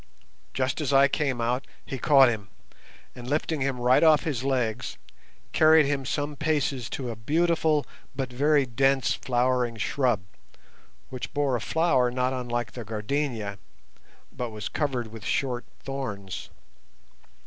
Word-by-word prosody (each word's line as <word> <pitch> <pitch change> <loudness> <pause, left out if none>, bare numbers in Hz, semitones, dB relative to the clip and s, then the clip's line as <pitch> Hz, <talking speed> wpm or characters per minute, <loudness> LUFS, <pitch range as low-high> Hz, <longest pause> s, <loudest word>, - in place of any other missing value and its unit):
Just 130 +3 0
as 145 - -1
I 135 0 +6
came 135 -3 -1
out 125 +3 -1 0.2
he 135 - -5
caught 135 -2 +6
him, 105 -4 -2 0.6
and, 125 0 -8
lifting 155 0 -1
him 130 -2 -1
right 125 +1 +4
off 155 -3 +5
his 135 -6 -2
legs, 125 -4 -1 0.6
carried 155 -1 +6
him 140 -1 -1
some 145 +1 -2
paces 145 -5 -1
to 125 -3 -4
a - - -6
beautiful 155 +4 +1 0.3
but 130 -2 -3
very 145 +2 +3
dense 135 -1 +2
flowering 125 0 0
shrub 120 -2 +1 0.9
which 130 -1 -6
bore 145 -3 +1
a 120 - -2
flower 130 0 +2
not 125 +1 0
unlike 120 -2 -3
the 120 - -7
gardenia, 110 -1 -3 0.7
but 120 -1 -4
was 110 -1 -6
covered 130 -6 -2
with 110 -2 -10
short 125 +3 -1 0.2
thorns. 105 -9 -5
130 Hz, 140 wpm, -26 LUFS, 120-145 Hz, 0.9 s, I